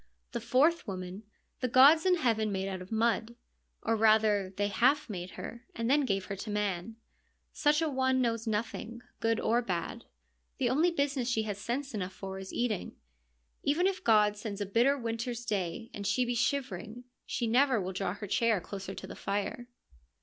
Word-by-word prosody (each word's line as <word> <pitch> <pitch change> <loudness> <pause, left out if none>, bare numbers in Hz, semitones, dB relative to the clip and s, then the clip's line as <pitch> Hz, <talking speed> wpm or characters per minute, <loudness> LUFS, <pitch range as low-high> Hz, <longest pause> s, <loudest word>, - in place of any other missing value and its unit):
The - - -3
fourth 305 +4 +3
woman 185 +1 -6 0.3
the 255 - 0
gods 285 +8 +7
in 365 - +5
heaven 225 -9 +1
made 190 0 -2
out 190 -1 -4
of 185 - -11
mud 230 +1 +1 0.2
— - - -39
or 225 - +2
rather 215 -3 +4
they 205 0 +1
half 255 +8 +2
made 180 -2 -5
her 235 +1 -7
— - - -33
and 230 +2 0
then 290 0 +4
gave 195 -5 -1
her 195 - -4
to 210 - -6
man. 205 0 -2 0.6
Such 300 +2 +2
a - - +1
one 260 -2 +1
knows 230 -2 0
nothing, 225 +2 -3 0.2
good 225 0 +1
or 235 +2 +2
bad; 200 +2 -4 0.5
the 255 -4 +1
only 315 +7 +4
business 280 -6 0
she 225 -2 +1
has 205 -2 -4
sense 260 +5 -3
enough 190 -3 -3
for 190 0 -6
is 190 0 -8
eating. 230 -5 -2 0.7
Even 310 +6 +2
if 380 -1 0
God 210 -2 +4
sends 205 -1 -6
a 205 - -1
bitter 240 +8 +3
winter's 235 0 -3
day 205 +1 -3
and 200 -1 -4
she 250 +5 +2
be 245 - -1
shivering, 245 -2 -2 0.2
she 240 - -1
never 250 +1 +3
will 190 0 -3
draw 185 0 -2
her 210 - -6
chair 220 +1 +2
closer 195 +1 -7
to - - -7
the - - -9
fire. 205 +4 -3
225 Hz, 195 wpm, -31 LUFS, 200-255 Hz, 0.7 s, gods